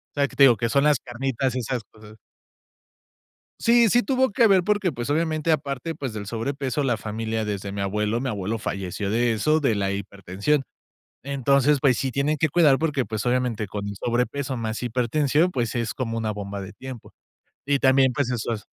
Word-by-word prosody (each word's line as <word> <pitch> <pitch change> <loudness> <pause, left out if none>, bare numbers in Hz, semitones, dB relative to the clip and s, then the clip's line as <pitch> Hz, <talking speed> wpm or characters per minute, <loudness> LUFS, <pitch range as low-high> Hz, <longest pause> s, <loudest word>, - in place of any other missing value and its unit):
sea, 140 -1 +2
que 135 - -15
te 140 - +5
digo, 125 -4 +7
que 115 +3 -1
son 140 +3 +2
las 150 -3 +4
carnitas 130 +1 -2
y 130 - 0
esas 125 0 -3
cosas. 110 0 -15 1.4
Sí, 235 0 +5
sí 245 +4 +3
tuvo 260 -1 +2
que 230 +2 +4
ver 195 -3 +5
porque, 205 -3 +1
pues, 120 +2 -4
obviamente 155 +1 0
aparte, 145 0 -2
pues 135 -6 -4
del 105 -2 -6
sobrepeso, 135 +4 -2
la 120 -3 +1
familia 110 +1 -3
desde 100 -1 -4
mi 100 - -4
abuelo 105 +3 -1
mi 135 - -2
abuelo 105 0 -2
falleció 100 -1 -4
de 120 +2 +2
eso, 155 +9 +2
de 135 -7 +1
la 100 -1 -1
hipertensión. 100 +7 -2 0.6
Entonces, 140 +1 +2
pues 130 -4 +3
sí 135 - -1
tienen 145 +3 0
que 160 - +2
cuidar 150 -3 +4
porque, 150 -5 0
pues, 110 0 -4
obviamente 120 -4 0
con 100 +1 -5
y 100 - -4
sobrepeso 125 +5 -1
más 115 -1 -3
hipertensión, 135 +8 +1
pues, 120 -3 -2
es 115 -2 -1
como 115 -3 -3
una 110 -1 -1
bomba 100 -1 -5
de 95 +1 -8
tiempo, 130 -2 -10 0.5
y 140 +1 +1
también, 130 -1 +4
pues 130 -1 -1
eso 120 -1 -2
hace 105 -2 -5
125 Hz, 200 wpm, -24 LUFS, 110-140 Hz, 1.4 s, digo